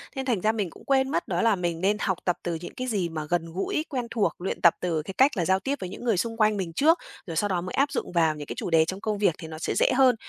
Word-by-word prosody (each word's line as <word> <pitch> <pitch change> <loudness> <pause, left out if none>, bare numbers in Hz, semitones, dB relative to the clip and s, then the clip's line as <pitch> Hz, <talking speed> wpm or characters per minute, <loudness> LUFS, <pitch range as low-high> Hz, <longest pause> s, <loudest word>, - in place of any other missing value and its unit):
nên 265 0 -3
thành 235 -8 0
ra 215 - +3
mình 210 -5 -2
cũng - - -16
quên 265 -1 +2
mất, 170 - -1
đó 175 -1 0
là 225 -3 +4
mình 170 -2 -2
nên 205 +2 +2
học 190 -4 0
tập 180 - +1
từ 170 -1 -2
những - - -8
cái 255 0 -4
gì 195 -7 0
mà 155 -2 -4
gần 165 -2 -1
gũi, 195 - -1
quen 250 -5 -3
thuộc, 215 -4 +1
luyện 185 - -3
tập 170 - +7
từ 165 -3 -1
cái 190 +6 -7
cách 265 -4 +4
là 175 - +1
giao 190 +2 +3
tiếp 270 +8 -1
với 185 - -5
những 195 - -9
người 230 -6 +2
xung 225 +3 -2
quanh 215 -1 +3
mình 175 -4 -3
trước, 320 - +4 0.3
rồi 165 - -5
sau 205 +6 +1
đó 180 -3 -1
mới 180 - -6
áp 280 +1 +2
dụng - - -3
vào 165 -3 +2
những 150 -1 -7
cái - - -5
chủ - - -3
đề 160 -1 +5
trong 190 +4 -5
công 215 -2 -1
việc 200 -6 +2
thì 160 - -8
nó 160 0 -8
sẽ - - -1
dễ - - +3
hơn. 255 -2 +5
190 Hz, 325 wpm, -26 LUFS, 170-230 Hz, 0.3 s, tập